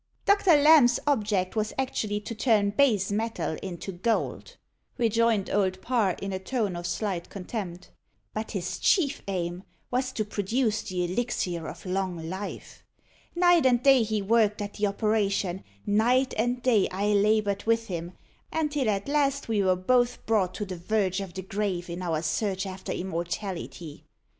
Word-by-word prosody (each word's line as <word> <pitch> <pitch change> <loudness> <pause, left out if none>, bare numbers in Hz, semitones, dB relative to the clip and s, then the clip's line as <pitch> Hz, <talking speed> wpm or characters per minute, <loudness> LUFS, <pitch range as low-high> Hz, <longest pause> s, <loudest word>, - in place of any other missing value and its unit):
"Doctor 400 -4 +5
Lamb's 290 -4 +6
object 210 -9 0
was 215 -1 -1
actually 220 -6 -1
to 220 - -6
turn 215 -3 +2
base 210 -5 +2
metal 220 -5 -2
into 190 0 -6
gold," 195 +6 -2 0.4
rejoined 230 -3 +2
Old 190 -2 +1
Parr, 220 -5 +1
in 195 0 -4
a 190 - -2
tone 205 -1 -2
of 175 0 -4
slight 185 -3 -3
contempt. 185 -2 -6 0.4
"But 215 +1 -4
his 180 -3 -4
chief 300 -8 +2
aim 175 -2 -3 0.3
was 255 +1 0
to 215 - -1
produce 215 +2 0
the 180 -1 -2
elixir 180 -4 -2
of - - -9
long 185 -1 -2
life. 190 +4 -7 0.5
Night 350 -4 +5
and 245 -1 +2
day 270 -2 +6
he 215 -2 -1
worked 215 0 +3
at 205 -1 -4
the 210 0 0
operation; 200 -3 0 0.2
night 245 +6 +2
and 245 +2 -1
day 230 -6 +3
I 200 +3 -1
laboured 205 -1 +2
with 230 0 +2
him, 175 -3 -5 0.4
until 295 -6 0
at 200 -1 -1
last 280 -1 +1
we 220 -3 +1
were 185 -1 +3
both 245 +6 +1
brought 205 -5 +1
to 210 - -3
the 185 -2 -6
verge 190 +1 0
of 195 -2 -7
the 190 - -5
grave 190 -3 -3
in 175 +2 -5
our 165 -3 -1
search 190 +5 -1
after 190 0 -6
immortality. 175 -2 -5
205 Hz, 160 wpm, -27 LUFS, 185-235 Hz, 0.5 s, Lamb's